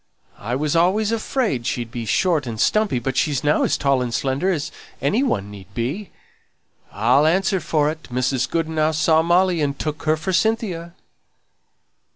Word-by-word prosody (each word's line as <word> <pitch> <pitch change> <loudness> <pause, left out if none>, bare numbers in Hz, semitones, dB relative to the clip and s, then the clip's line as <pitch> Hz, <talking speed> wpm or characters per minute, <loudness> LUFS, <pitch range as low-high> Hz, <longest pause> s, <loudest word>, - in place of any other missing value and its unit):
I 120 +4 -3
was 150 +3 -1
always 195 +6 +2
afraid 220 - -1
she'd 120 -2 -3
be 115 -2 -5
short 155 - +1
and 110 -2 -5
stumpy, 215 - +2
but 125 +2 -3
she's 145 -1 0
now 150 +1 +2
as - - +1
tall 140 -2 +1
and 125 -1 -2
slender 135 +8 0
as 155 -5 -2 0.3
anyone 140 - 0
need 100 -1 -12
be. 150 - -3 0.8
I'll 125 +8 +3
answer 190 +3 +2
for 155 -2 +1
it, 160 0 -10
Mrs. 125 +1 -1
Goodenough 160 -1 0
saw 160 +1 +3
Molly, 175 0 +2
and 140 -1 -1
took 150 0 -4
her 155 0 +2
for 175 +4 -3
Cynthia." 185 -5 -1
155 Hz, 165 wpm, -21 LUFS, 130-180 Hz, 0.8 s, I'll